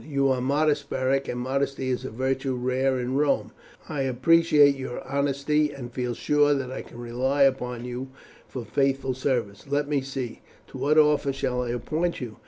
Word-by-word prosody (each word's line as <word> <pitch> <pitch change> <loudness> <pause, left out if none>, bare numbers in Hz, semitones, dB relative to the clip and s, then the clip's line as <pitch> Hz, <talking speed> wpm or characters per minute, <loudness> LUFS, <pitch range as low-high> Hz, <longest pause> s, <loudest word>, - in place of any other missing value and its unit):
"You 140 -2 +1
are 130 -1 +1
modest, 145 +3 +1
Beric, 135 +1 0
and 125 - -3
modesty 135 +1 -1
is 125 0 -2
a - - -3
virtue 130 +2 -1
rare 130 +1 0
in 125 +2 -1
Rome; 145 -1 +1 0.4
but - - -7
I 145 - -1
appreciate 145 +2 +4
your 130 -2 -6
honesty, 140 +2 +1
and 125 -4 -8
feel 125 -2 -2
sure 145 +2 +3
that 130 -2 -3
I 130 - -5
can - - -13
rely 125 +4 +1
upon 125 -3 0
you 125 +2 -5 0.4
for 125 -3 -6
faithful 135 +3 0
service. 125 -5 -2
Let 145 +1 0
me 145 -2 +1
see, 130 -3 -5 0.3
to 130 - -9
what 145 +4 +2
office 150 -2 +4
shall 125 -2 -1
I 125 - -3
appoint 155 +9 -1
you? 120 -4 -7
135 Hz, 190 wpm, -26 LUFS, 125-140 Hz, 0.4 s, appreciate